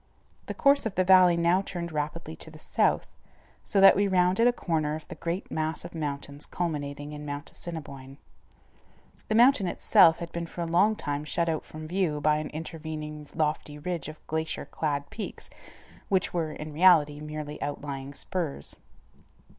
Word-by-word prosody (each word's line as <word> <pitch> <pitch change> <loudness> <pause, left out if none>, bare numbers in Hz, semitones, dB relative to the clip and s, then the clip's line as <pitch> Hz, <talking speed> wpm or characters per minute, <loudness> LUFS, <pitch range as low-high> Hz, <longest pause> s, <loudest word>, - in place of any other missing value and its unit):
The - - -4
course 280 -3 +4
of 205 - -7
the 185 - +3
valley 180 -2 +6
now 170 +3 +3
turned 170 -3 -5
rapidly 150 - -4
to - - -8
the - - -13
south, - - +1 0.6
so 200 - 0
that 195 0 +9
we 200 +1 +2
rounded 185 +4 +3
a - - +6
corner 155 -9 -1
of 155 - -9
the - - -7
great 170 +3 -4
mass 160 +1 -2
of 175 - -9
mountains 145 -2 -5
culminating 145 -4 -3
in 150 0 -7
Mount 145 +1 -5
Assiniboine. 140 -5 -8 1.1
The 215 - +1
mountain 240 -4 +5
itself 165 -1 +5
had 170 -1 -7
been 170 0 -4
for 175 - -7
a - - -1
long 185 +6 +3
time 145 -6 -3
shut 170 +3 -1
out 160 -1 -2
from 155 0 -8
view 175 -4 0
by 150 +1 +3
an 155 0 -4
intervening 155 -1 -6
lofty 150 -1 -1
ridge 165 -1 -4
of 155 0 -11
glacier 160 0 -2
clad 145 -2 -2
peaks, 220 - -7 0.6
which 190 -2 +1
were, 165 -3 -1
in 155 0 -7
reality, 150 -3 +5
merely 150 0 -6
outlying 140 -1 -5
spurs. 165 - -3
160 Hz, 170 wpm, -28 LUFS, 150-180 Hz, 1.1 s, that